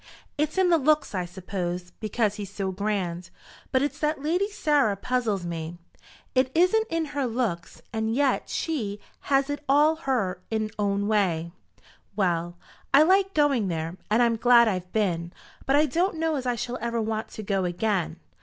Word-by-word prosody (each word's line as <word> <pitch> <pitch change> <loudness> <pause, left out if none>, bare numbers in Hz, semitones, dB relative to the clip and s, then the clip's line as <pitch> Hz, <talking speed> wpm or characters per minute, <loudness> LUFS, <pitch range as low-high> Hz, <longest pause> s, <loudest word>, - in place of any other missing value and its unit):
"It's 305 +3 -1
in 370 -2 +4
the 335 - +5
looks, 305 -1 +2
I 180 -2 -1
suppose, 180 -1 -5
because 215 -1 0
he's 205 -2 -7
so 195 -2 -3
grand. 185 -3 -2 0.4
But 260 0 +2
it's 290 - -2
that 300 -2 -1
Lady 355 +6 +1
Sarah 295 - +2
puzzles 220 -5 -1
me. 165 0 -5 0.6
It 255 0 +3
isn't 370 +7 +3
in 330 -1 0
her 280 -3 0
looks, 225 -8 -3
and 220 0 -1
yet 280 0 +1
she 220 -11 -2 0.3
has 275 -1 +3
it 290 0 -4
all 300 +3 +5 0.5
in 220 -1 -1
her 215 - -23
own 200 0 0
way. 175 -6 +1 0.6
Well; 175 -3 0 0.3
I 280 +2 +7
liked 385 +3 +3
going 280 -8 +3
there, 165 -1 -3
and 225 +3 +4
I'm 230 -1 +2
glad 235 0 +6
I've 185 -3 -2
been; 175 -5 -1 0.3
but 270 - +3
I 300 +1 +5
don't 340 +6 0
know 325 0 0
as 260 -3 -3
I 245 - +1
shall 245 +2 -4
ever 235 0 -1
want 220 0 -2
to 215 - -8
go 195 -1 0
again." 180 0 -1
220 Hz, 175 wpm, -26 LUFS, 190-290 Hz, 0.6 s, I